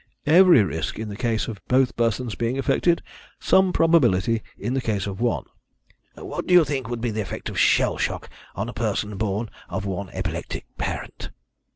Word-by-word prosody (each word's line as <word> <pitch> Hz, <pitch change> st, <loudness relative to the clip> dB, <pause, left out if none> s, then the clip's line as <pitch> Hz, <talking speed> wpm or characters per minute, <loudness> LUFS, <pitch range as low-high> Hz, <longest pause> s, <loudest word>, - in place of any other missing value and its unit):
"Every 170 Hz, -, +7 dB
risk 80 Hz, -3 st, -3 dB
in 110 Hz, -1 st, -5 dB
the 100 Hz, -, -6 dB
case 115 Hz, 0 st, -1 dB
of 105 Hz, -4 st, -7 dB
both 130 Hz, 0 st, +2 dB
persons 115 Hz, 0 st, 0 dB
being 120 Hz, +4 st, -2 dB
affected; 140 Hz, +5 st, +1 dB, 0.4 s
some 190 Hz, -1 st, +4 dB
probability 120 Hz, -, +3 dB, 0.2 s
in 120 Hz, -, -3 dB
the 135 Hz, -, 0 dB
case 105 Hz, -5 st, -1 dB
of 100 Hz, +1 st, -5 dB
one." 120 Hz, -1 st, 0 dB, 0.7 s
"What -, -, -6 dB
do 180 Hz, -, +5 dB
you 175 Hz, -3 st, +7 dB
think 135 Hz, -4 st, -3 dB
would 120 Hz, -1 st, -4 dB
be 120 Hz, -1 st, -1 dB
the 110 Hz, 0 st, -2 dB
effect 95 Hz, -, -5 dB
of -, -, -3 dB
shell -, -, +3 dB
shock -, -, -2 dB, 0.3 s
on -, -, -3 dB
a -, -, -6 dB
person 105 Hz, 0 st, -2 dB
born 105 Hz, +2 st, -2 dB, 0.2 s
of 95 Hz, +2 st, -3 dB
one 95 Hz, 0 st, -4 dB
epileptic -, -, -4 dB
parent?" -, -, -4 dB
115 Hz, 185 wpm, -24 LUFS, 105-135 Hz, 0.7 s, Every